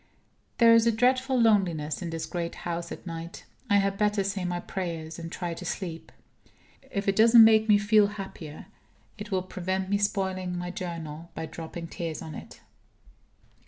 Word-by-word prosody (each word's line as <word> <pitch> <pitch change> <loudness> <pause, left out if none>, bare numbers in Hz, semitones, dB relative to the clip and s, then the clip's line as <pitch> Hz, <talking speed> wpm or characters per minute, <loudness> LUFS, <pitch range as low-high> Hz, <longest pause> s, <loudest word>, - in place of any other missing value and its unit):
There 230 -1 +7
is 230 0 +5
a - - +5
dreadful 255 +3 +2
loneliness 185 -10 +2
in 175 - -4
this 165 -1 -4
great 170 -1 -4
house 170 0 -3
at - - -8
night. 165 0 -7 0.2
I 205 - +4
had 195 0 0
better 210 -1 +2
say 195 -1 -2
my 175 0 -2
prayers, 170 -3 -5
and 165 0 -7
try 175 -2 -4
to - - -8
sleep. 170 -4 -5 0.8
If 200 0 -3
it 195 - +2
doesn't 230 +2 +8
make 220 0 +5
me 210 - +7
feel 205 0 +4
happier, 190 -7 -8 0.5
it 210 0 -7
will 190 -3 0
prevent 185 +1 -3
me 200 - +2
spoiling 190 -3 -1
my 175 0 -4
Journal 170 -4 -6
by - - -4
dropping 165 +1 -7
tears 165 -1 -5
on 160 -1 -8
it. - - -10
185 Hz, 175 wpm, -27 LUFS, 170-210 Hz, 0.8 s, doesn't